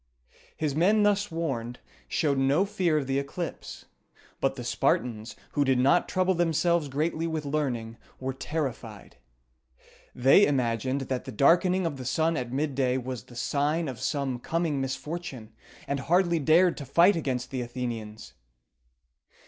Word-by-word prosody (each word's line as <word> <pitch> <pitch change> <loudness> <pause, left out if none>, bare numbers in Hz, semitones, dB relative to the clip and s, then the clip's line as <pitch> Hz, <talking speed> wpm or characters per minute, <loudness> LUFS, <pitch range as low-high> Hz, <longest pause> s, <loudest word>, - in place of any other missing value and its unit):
His 150 -3 -1
men, 205 +7 +4
thus 205 0 +2
warned, 135 -8 -3 0.3
showed 140 -3 0
no 140 +8 +3
fear 185 -6 0
of 145 - -1
the 135 +1 0
eclipse; 160 +5 -6 0.5
but - - 0
the - - -6
Spartans, 110 -2 -1 0.2
who 145 - +1
did 135 -2 +2
not 140 +8 +3
trouble 185 0 +2
themselves 170 -1 +1
greatly 155 +4 -1
with 160 -2 -3
learning, 125 -6 -2 0.2
were 130 0 -3
terrified. 145 -2 -5 1.0
They 135 +11 +6
imagined 130 0 0
that 130 -1 -3
the 130 - -6
darkening 180 - +3
of 155 -4 -2
the 130 - -7
sun 160 +6 +1
at 125 -3 -3
midday 135 -2 0
was 125 -3 -5
the 120 - -15
sign 145 +6 0
of 130 -3 -6
some 135 -1 -2
coming 160 0 -1
misfortune, 135 -4 -5 0.3
and 140 0 -1
hardly 170 +3 +2
dared 165 +4 +4
to 140 - -6
fight 175 +8 +5
against 130 -6 -3
the 130 -2 -2
Athenians. 115 - -6
140 Hz, 150 wpm, -27 LUFS, 125-165 Hz, 1.0 s, They